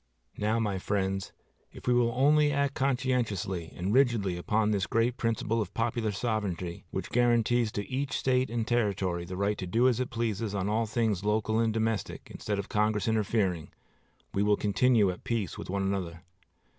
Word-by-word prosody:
Now, 110 +2 +1
my 105 -4 -1
friends, 95 0 -1 0.4
if - - -12
we 125 - +3
will 120 -1 +3
only 145 +3 +4
act 140 -1 +1
conscientiously 120 -11 -1
and 95 +4 -2
rigidly 115 -8 +3
upon 105 +4 +1
this 100 -1 0
great 115 +2 +1
principle 115 -1 0
of 105 - -6
popular 115 -1 0
sovereignty, 100 -6 -3
which - - -5
guarantees 120 -1 +2
to 100 -1 -3
each 135 +2 -2
State 130 0 +1
and 115 0 -2
Territory 100 -7 0
the 90 +1 -6
right 100 +1 0
to 95 - -4
do 115 +7 +3
as 125 -2 +2
it 130 - -1
pleases 115 -3 -2
on 95 0 -1
all 110 +2 +1
things 105 -3 0
local 110 +1 +1
and 115 -1 +2
domestic 110 -1 -2
instead 105 -1 -3
of 100 - -4
Congress 105 0 +1
interfering, 105 -6 0 0.6
we 100 - +1
will 105 0 +3
continue 105 -1 +3
at 90 - -10
peace 110 -8 -2
one 100 +1 -3
with - - +1
another. 85 -3 -5
110 Hz, 180 wpm, -29 LUFS, 100-120 Hz, 0.6 s, only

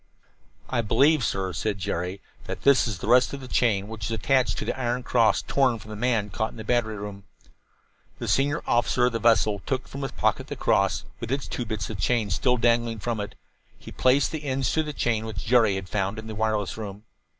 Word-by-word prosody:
"I 125 -2 0
believe, 135 +7 +3
sir," 95 -3 -1
said 105 +1 -2
Jerry, 95 0 -3 0.2
"that - - -6
this 140 -2 +5
is 105 -5 -3
the 95 - -6
rest 125 +3 +4
of 140 - -4
the 130 - -9
chain 105 -6 +1
which 110 -2 -6
was 115 -1 -2
attached 130 +7 +2
to - - -3
the - - -1
iron 125 -1 -2
cross 115 -3 +3
torn 130 -4 +2
from 110 -1 -12
the - - -5
man 110 -2 0
caught 110 +3 -1
in - - -14
the 110 - -6
battery 110 -1 0
room." 100 -1 -7 0.9
The - - -5
senior 145 +3 +1
officer 120 +1 +2
of 125 - +2
the 115 - -2
vessel 110 -3 +3
took 130 -1 -2
from 140 - -7
his 135 - -4
pocket - - 0
the - - -5
cross, - - +1
with 115 - -5
its 135 0 -1
two 120 - -4
bits 110 -1 -4
of 105 - -6
chain 110 -1 +1
still 125 +7 +2
dangling 120 -1 +2
from 115 +1 -3
it. 100 - -5 0.4
He - - -11
placed 130 +2 +3
the 155 -2 -5
ends 135 -2 0
to 160 - +2
the 150 -1 -4
chain 115 -6 0
which 110 -3 -6
Jerry 115 -4 +4
had 95 0 -5
found 100 +1 -2
in 110 - -7
the 110 - -6
wireless 110 -1 -1
room. 105 -1 -7
115 Hz, 230 wpm, -25 LUFS, 105-125 Hz, 0.9 s, this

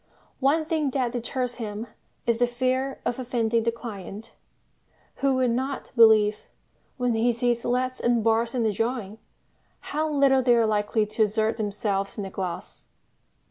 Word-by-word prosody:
One 295 +4 +2
thing 310 -3 0
that 255 -2 -1
deters 250 +1 -3
him 215 -1 -5 0.4
is 235 -1 +1
the 245 - +4
fear 255 +2 -1
of 240 +1 -1
offending 235 -2 0
the 230 +1 +1
client, 220 -1 -8 0.8
who 275 -1 +2
will 255 -1 +2
not 260 +3 -2
believe, 220 -2 +5 0.5
when 245 -2 +1
he 230 +2 +2
sees 235 0 0
leads 255 +1 -1
and 240 -2 +1
bars 230 +2 +1
in 235 -2 +1
a 220 - +2
drawing, 225 -1 -3 0.7
how 310 +1 0
little 275 -2 +4
they 245 -1 +4
are 230 -1 +3
likely 210 0 +1
to 215 +2 -3
assert 220 +1 +1
themselves 200 -2 -2
in 205 - -3
the 190 - -6
glass. 185 -3 -6
235 Hz, 160 wpm, -25 LUFS, 220-255 Hz, 0.8 s, believe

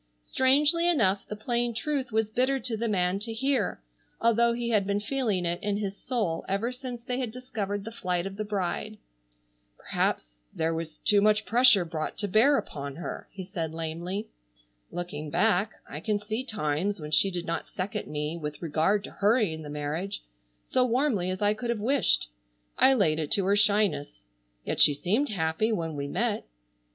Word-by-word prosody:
Strangely 295 - +3
enough 200 - +2
the 210 - -5
plain 235 +2 -1
truth 275 -1 -2
was 220 0 +1
bitter 260 +4 +2
to 245 -3 -3
the 230 +2 -1
man 185 -2 +1
to 225 +3 -4
hear, 240 - 0 0.4
although 235 +1 +4
he 235 0 -2
had 205 -3 +2
been 200 0 +1
feeling 210 -5 -1
it 170 +1 -1
in 205 -1 -1
his 200 -2 -3
soul 210 -10 -2
ever 200 +5 0
since 250 -2 -7
they 250 +1 -2
had 250 -3 -1
discovered 210 -4 -4
the 225 - -6
flight 180 -5 -2
of 195 0 -5
the 215 - -3
bride. 210 +1 -3 0.8
"Perhaps - - -1 0.2
there 165 0 -1
was 160 -1 -5
too 205 -1 +3
much 215 +1 +3
pressure 235 -5 +5
brought 160 -2 -4
to 205 - -1
bear 235 +9 +5
upon 140 - -5
her," 170 - -6
he 190 - -7
said 165 -4 -4
lamely. 170 +5 -4 0.6
"Looking 155 -4 -5
back 200 +4 +2
I 150 - -6
can 210 +5 0
see 215 +4 -3
times 200 - -1
when 150 -1 -7
she 195 +5 +4
did 175 -2 -4
not 165 -1 -3
second 200 +3 -4
me 150 +2 -3
with 150 -2 -5
regard 170 +6 +1
to - - -8
hurrying 205 -6 +2
the 150 - -8
marriage, 150 +7 -3 0.4
so 255 - +2
warmly 245 -7 +1
as 185 +2 -2
I 205 0 +4
could 230 +3 -5
have 235 -2 0
wished. 260 - +2 0.5
I 270 - +5
laid 160 -9 +2
it 155 -2 -2
to 195 - +1
her 200 +1 +3
shyness. 205 - +1 0.4
Yet - - 0
she 145 - +7
seemed 210 - +1
happy 170 +3 0
when 165 -7 -2
we 140 0 -3
met. 140 - -1
205 Hz, 185 wpm, -28 LUFS, 170-235 Hz, 0.8 s, she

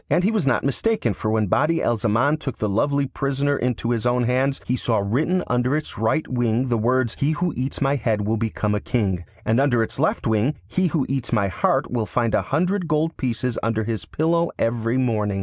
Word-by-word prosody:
And 180 - +2
he 205 - +3
was 210 -10 0
not 125 - +2
mistaken, 140 - 0
for 110 - -3
when 110 0 +2
Badi 155 - +1
al 120 - +2
Zaman 115 +7 +1
took 140 -4 -5
the 105 - -1
lovely 140 +8 +1
prisoner 140 +1 -1
into 120 -2 -1
his 120 0 0
own 120 0 +2
hands, 130 +3 +1
he 125 - 0
saw 115 -3 0
written 135 - 0
under 125 +3 +1
its 155 - -5
right 115 +9 0
wing 120 0 0
the 120 - +2
words, 120 +1 +1
'He 145 +3 +2
who 175 +1 -1
eats 130 +3 -3
my 140 +1 +2
head 110 -4 0
will 110 +2 0
become 110 -1 -1
a 105 - 0
king,' 95 -7 -1 0.2
and 115 +3 +2
under 125 -5 +3
its - - -5
left - - 0
wing, 110 +7 +1
'He 185 0 +1
who 155 -4 0
eats 135 -2 -3
my 105 -4 +2
heart 90 - 0
will 115 -3 -1
find 115 -3 0
a 105 - +3
hundred 180 - 0
gold 160 +1 0
pieces 125 -1 -2
under 110 0 0
his 110 0 -3
pillow 170 +2 +1
every 115 +1 0
morning. 105 -6 0
125 Hz, 220 wpm, -22 LUFS, 110-145 Hz, 0.2 s, he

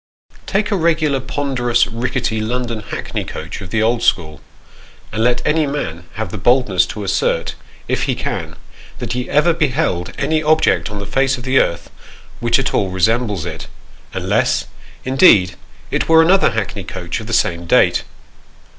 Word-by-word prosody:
Take 205 +2 0
a - - +2
regular, 155 -5 +1
ponderous, 125 -3 0
rickety, 115 -1 -2
London 120 0 -2
hackney 105 - -5
coach - - -7
of 95 - -8
the 110 +3 0
old 115 +1 +1
school, 80 -8 0 0.7
and 110 - -1
let 120 0 +1
any 155 -1 +2
man 85 - -4
have 105 -4 -4
the 105 - -5
boldness 105 -4 +3
to 105 - -6
assert, 100 - 0 0.3
if - - 0
he - - 0
can, - - -4 0.4
that 115 - -4
he 125 0 -3
ever 150 +4 +3
beheld 140 - 0
any 155 +3 0
object 155 - +2
on 105 - -6
the 100 - -5
face 135 +5 +1
of 120 - -9
the 130 +1 +3
earth 85 - -1 0.5
which - - +2
at - - -1
all 100 - +1
resembles 105 0 0
it, - - -6 0.4
unless, - - 0 0.4
indeed, 120 - +5 0.4
it - - -1
were 160 0 +7
another 190 +4 +4
hackney 110 -2 -3
coach 85 +1 -5
of 110 - -9
the - - -5
same 85 -7 0
date. - - +4
120 Hz, 165 wpm, -18 LUFS, 100-140 Hz, 0.7 s, were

